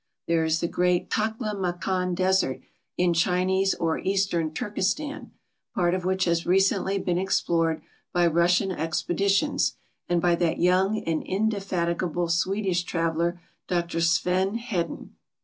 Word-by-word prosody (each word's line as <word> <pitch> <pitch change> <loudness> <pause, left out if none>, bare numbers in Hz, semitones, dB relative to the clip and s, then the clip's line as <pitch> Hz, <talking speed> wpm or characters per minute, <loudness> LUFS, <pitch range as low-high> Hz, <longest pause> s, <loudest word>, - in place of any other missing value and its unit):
There 165 -1 +1
is 160 0 +1
the 170 - +1
great 180 0 0
Takla 220 0 -1
Makan 180 -1 -1
desert 185 -7 +1 0.4
in 175 -1 +2
Chinese 185 +3 +2
or 165 -1 -1
Eastern 190 -4 0
Turkistan, 210 - -3 0.5
part 175 -2 +2
of 185 -1 -2
which 190 0 +1
has 170 -1 +1
recently 195 +1 +2
been 180 -2 -1
explored 165 -4 0 0.3
by 175 0 +2
Russian 175 +3 +3
expeditions 185 - 0 0.3
and 175 -1 +2
b3^that 170 -1 +1
young 185 +4 +3
and 165 -1 -1
indefatigable 180 -4 -1
Swedish 185 +1 +1
traveler, 170 0 -1 0.3
Dr 170 -2 -1
Sven 180 +5 +1
Hedin. 225 -8 -4
180 Hz, 125 wpm, -26 LUFS, 170-195 Hz, 0.5 s, Russian